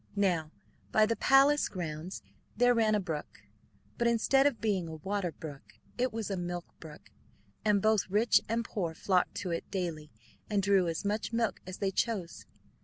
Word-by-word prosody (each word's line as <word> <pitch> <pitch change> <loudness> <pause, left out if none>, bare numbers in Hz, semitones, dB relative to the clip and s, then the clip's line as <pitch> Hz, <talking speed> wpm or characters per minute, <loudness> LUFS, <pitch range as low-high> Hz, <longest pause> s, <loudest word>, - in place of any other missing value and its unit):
Now 180 -6 +1 0.4
by 215 - +5
the 230 +1 0
palace 275 +4 +4
grounds 170 0 -5 0.3
there 245 +1 +5
ran 220 -2 +3
a - - +2
brook, 155 - -6 0.6
but 235 - +3
instead 270 +4 +4
of 280 - -1
being 195 -6 0
a 160 - -6
water 190 +2 -2
brook 145 -3 -10 0.2
it 250 +1 0
was 220 -2 -4
a - - 0
milk 175 0 -4
brook, 155 -2 -12 0.5
and 210 -2 +2
both 215 -3 +2
rich 215 +5 +4
and 230 +1 0
poor 170 -6 -3
flocked 185 +1 +1
to 185 - -3
it 165 - -4
daily 170 -6 -3 0.4
and 205 -2 +1
drew 195 -2 +3
as 165 +4 -3
much 210 +2 -1
milk 230 -1 0
as 185 - -6
they 195 -1 -1
chose. 195 -4 -2
200 Hz, 180 wpm, -31 LUFS, 175-225 Hz, 0.6 s, by